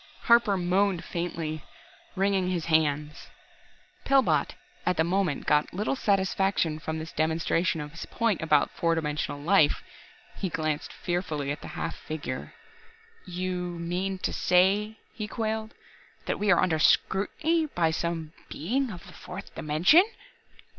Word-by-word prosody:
Harper 235 -4 +5
moaned 185 0 +1
faintly, 165 -3 -4 0.5
wringing 195 -1 +1
his 175 -3 -1
hands. 150 -2 0 0.8
Pillbot 270 -1 +2 0.3
at 180 - 0
the 160 - +4
moment 180 -3 0
got 150 +3 +2
little 210 +7 0
satisfaction 195 -7 +1
from 160 0 -4
this 160 +1 -6
demonstration 165 +2 0
of 150 0 -6
his 165 - -8
point 230 -5 0
about 155 -2 +3
four 165 -1 +1
dimensional 150 -2 -2
life. 155 -1 +3 0.5
He 190 - -2
glanced 155 -3 -2
fearfully 160 -6 -2
at 145 - -5
the - - -8
half - - -3
figure. 145 -5 -6 0.7
"You 185 +1 -3
you 180 - -2 0.2
mean 180 +3 -2
to - - -1
say," 200 +4 +2 0.2
he 210 -2 -5
quailed, 220 0 -3 0.5
"that - - -2
we 210 - 0
are 175 - +6
under 165 -4 +1
scrutiny 315 - +2
by 170 - +1
some 165 -1 -3 0.2
Being 250 - -1
of 180 -5 -9
the - - -13
fourth 190 +2 -9
dimension?" 160 - +5
175 Hz, 140 wpm, -27 LUFS, 155-195 Hz, 0.8 s, are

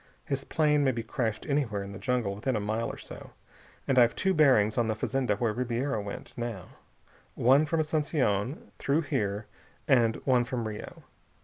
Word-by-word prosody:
His 135 -1 -2
plane 150 -2 +2
may 135 - +3
be 115 -2 -4
crashed 115 -1 -2
anywhere 125 -9 0
in 100 - -8
the 100 - -8
jungle 125 -6 0
within 120 +5 -2
a - - +1
mile 110 +3 -2
or - - -6
so. - - -11 0.5
And 130 -1 +4
I've 120 -1 +5
two 190 0 +1
bearings 130 - +4
on 120 -2 +1
the 110 - 0
fazenda 125 -1 0
where 110 +1 0
Ribiera 120 0 -1
went, 100 0 -8
now. 120 -7 -5 0.7
One 135 +5 +4
from 160 +1 +1
Asunción 145 - -1
through 145 +4 +1
here 105 -7 -2 0.4
and 115 -4 +4
one 125 -3 +4
from 120 -2 -3
Rio. 105 -1 -8
120 Hz, 180 wpm, -29 LUFS, 110-140 Hz, 0.7 s, I've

